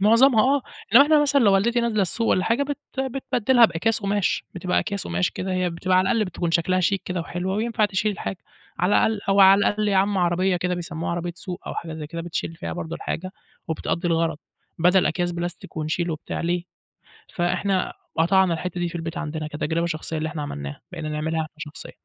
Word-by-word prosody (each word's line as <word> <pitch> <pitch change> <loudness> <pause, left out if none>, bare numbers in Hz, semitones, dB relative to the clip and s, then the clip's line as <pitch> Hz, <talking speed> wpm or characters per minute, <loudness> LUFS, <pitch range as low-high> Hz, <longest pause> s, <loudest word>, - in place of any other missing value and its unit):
معظَمها، 230 +3 +6
آه. 280 - 0 0.3
إنما 275 +5 +9
إحنا 300 0 +4
مثلًا 280 -1 +3
لو 205 -4 +5
والدتي 235 +5 +2
نازِلة 220 -4 +1
السوق 225 +5 -1
والّا 185 - +2
حاجة، 230 +7 +2
بت 290 0 -3 0.2
بتبدّلها 260 -2 +3
بأكياس 225 +4 +1
قُماش. 200 -1 0
بتبقى 180 0 0
أكياس 200 -2 -3
قُماش 85 +1 0
كده، 185 0 -4
هي 185 -1 0
بتبقى 185 +2 0
على 190 0 +2
الأقل 225 -2 +2
بتكون 175 -2 -3
شكلها 185 +2 +2
شيك 195 +2 +1
كده 180 -1 -2
وحلوة، 180 +3 -3
وينفع 225 0 +1
تشِيل 205 +1 0
الحاجة. 195 - -5 0.4
على 180 +4 +2
الأقل، 220 -2 -1
أو 195 0 +4
على 195 +1 +8
الأقل 210 +1 +1
يا 195 - +2
عم 195 0 +2
عربيَّة 180 +1 +2
كده 180 0 -1
بيسَمُّوها 165 -2 -4
عربيَّة 175 0 -3
سوق، 180 -1 -7
أو - - -4
حاجة 165 -1 -5
زي 155 -1 -6
كده، 165 +1 -6
بتشِيل 165 -1 -4
فيها 180 - -5
برضه 165 -1 -5
الحاجة 185 +3 -4 0.4
وبتقضّي 170 +2 -1
الغرض، 165 -2 +1 0.4
بدل 180 +2 +4
أكياس 175 +1 -1
بلاستيك 170 -1 -6
ونشِيل 160 +3 -1
وبتاع، 155 - -4
ليه؟ 175 +1 -1 0.7
فإحنا 185 +2 0 0.2
قطَعنا 185 +2 +4
الحتة 175 +2 -4
دي 175 - -1
في 175 - -9
البيت 165 -1 -4
عندنا 155 -1 -4
كتجربة 160 +2 -1
شخصية، 160 -1 -3
اللي 155 0 -2
إحنا 150 -1 -5
عملناها، 70 - -6
بقينا 160 -3 -5
نعملها 155 +2 -2
إحنا 155 0 -8
شخصيًا، 150 0 -8
180 Hz, 205 wpm, -24 LUFS, 165-205 Hz, 0.7 s, إنما